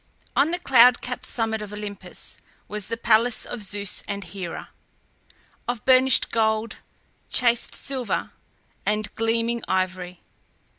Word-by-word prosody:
On 295 - +4
the 350 - 0
cloud 250 -6 +6
capped 250 0 -5
summit 225 -2 -1
of 210 -1 -7
Olympus 210 -1 -6 0.3
was 210 -2 -4
the 230 - -3
palace 230 +1 +3
of 240 - -6
Zeus 200 -1 0
and 200 -1 -4
Hera, 175 -1 -7 1.0
of 240 -3 -3
burnished 260 -1 +5
gold, 220 0 +1 0.5
chased 240 -2 +2
silver, 260 -4 -2 0.5
and 210 0 -1
gleaming 230 +1 0
ivory. 185 -1 -2
220 Hz, 120 wpm, -24 LUFS, 205-240 Hz, 1.0 s, cloud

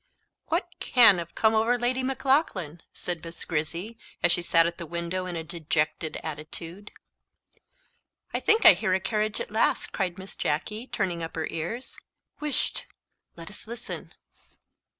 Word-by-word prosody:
"WHAT 335 +3 0
can 225 -7 +6
have 170 0 -7
come 220 0 +4
over 225 +3 +3
Lady 245 +2 0
Maclaughlan?" 260 - 0
said 175 -2 -4
Miss 165 0 -5
Grizzy, 170 +8 -3 0.2
as - - +5
she 175 - +2
sat 165 -1 +4
at 170 0 -2
the 170 - -6
window 170 +3 -3
in 180 - -4
a 165 - -3
dejected 160 -1 -1
attitude. 165 +5 -5 1.4
"I - - +1
think 440 +1 +3
I - - +12
hear 185 0 +1
a - - +1
carriage 215 +1 -1
at - - -5
last," 220 - +1
cried 185 -2 -2
Miss 190 +1 -8
Jacky, 215 - -2
turning 180 -8 -1
up 165 - -5
her 160 -1 -1
ears. 200 +11 -3 0.4
"Wisht! 300 -2 -1 0.5
let 170 +4 -9
us 210 - -10
listen." 235 0 -7
185 Hz, 155 wpm, -27 LUFS, 165-225 Hz, 1.4 s, I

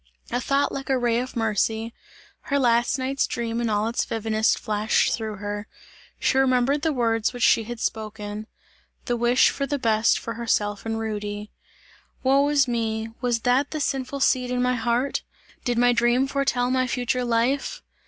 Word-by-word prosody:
A 245 - 0
thought 275 +3 +1
like 270 0 -6
a 265 - +3
ray 240 -1 +1
of 255 +2 -5
mercy, 225 0 0 0.6
her 280 - +2
last 240 -1 +2
night's 265 +1 0
dream 235 0 -2
in 235 - 0
all 210 +1 +1
its 235 - 0
vividness 220 0 +1
flashed 215 -1 +1
through 220 -2 -3
her; 205 +1 -5 0.5
she 265 - +2
remembered 265 +2 +2
the 320 0 +1
words 230 -4 0
which 245 -1 -3
she 225 - +4
had 240 +1 -6
spoken: 215 -1 -4 0.6
"the 240 - 0
wish 240 +2 +4
for 275 - -3
the 285 - -1
best 225 -3 +2
for 230 - -5
herself 210 -2 -1
and 225 0 -1
Rudy." 210 -1 -4 0.7
"Woe 275 +2 +4
is 285 -2 +3
me! 225 -2 -2
Was 240 -2 0
that 255 +4 +2
the 310 - -4
sinful 270 -1 -2
seed 250 -1 +2
in 250 0 -1
my 250 0 +2
heart? 240 +3 0 0.4
Did 245 -2 -1
my 245 0 +4
dream 240 +2 +3
foretell 270 -3 0
my 255 0 +1
future 250 0 -1
life? 245 - 0
240 Hz, 175 wpm, -24 LUFS, 225-260 Hz, 0.7 s, she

